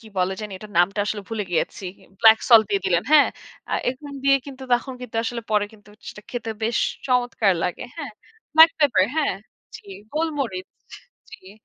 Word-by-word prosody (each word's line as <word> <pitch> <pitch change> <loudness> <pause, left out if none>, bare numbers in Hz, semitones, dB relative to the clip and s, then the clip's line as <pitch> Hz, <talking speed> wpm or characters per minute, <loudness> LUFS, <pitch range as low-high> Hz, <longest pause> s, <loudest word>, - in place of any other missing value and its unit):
কি 220 - -14
বলে 185 +1 +1
জানি? 210 -2 -6
এটার 210 0 -12
নামটা 195 +4 +2
আসলে 205 -1 -3
ভুলে 220 -3 -3
গেছি। 175 +3 -2 0.4
ব্ল্যাকসল্ট 225 0 +6
দিয়ে 200 -2 0
দিলেন। 175 -2 +2
হ্যাঁ? 300 -2 +7 0.4
আ - - -3 0.2
এগুলো 280 +3 -10
দিয়ে 275 0 +5
কিন্তু 265 -1 -10
তখন 255 +2 -3
কিন্তু 245 -2 -7
আসলে 235 0 -4
পরে 210 -1 +2
কিন্তু 210 -1 -19 0.2
সেটা 210 - -10
খেতে 235 -2 -4
বেশ 230 +1 0 0.3
চমৎকার 245 -5 +2
লাগে। 180 - -3
হ্যাঁ? 285 -8 -6 0.4
ব্ল্যাকপেপার, 305 - +6
হ্যাঁ? 300 -10 +1 0.4
জ্বী। 200 - -13 0.2
গোলমরিচ 280 - -2 0.6
জ্বী। 190 -4 -13
225 Hz, 165 wpm, -23 LUFS, 205-265 Hz, 0.6 s, হ্যাঁ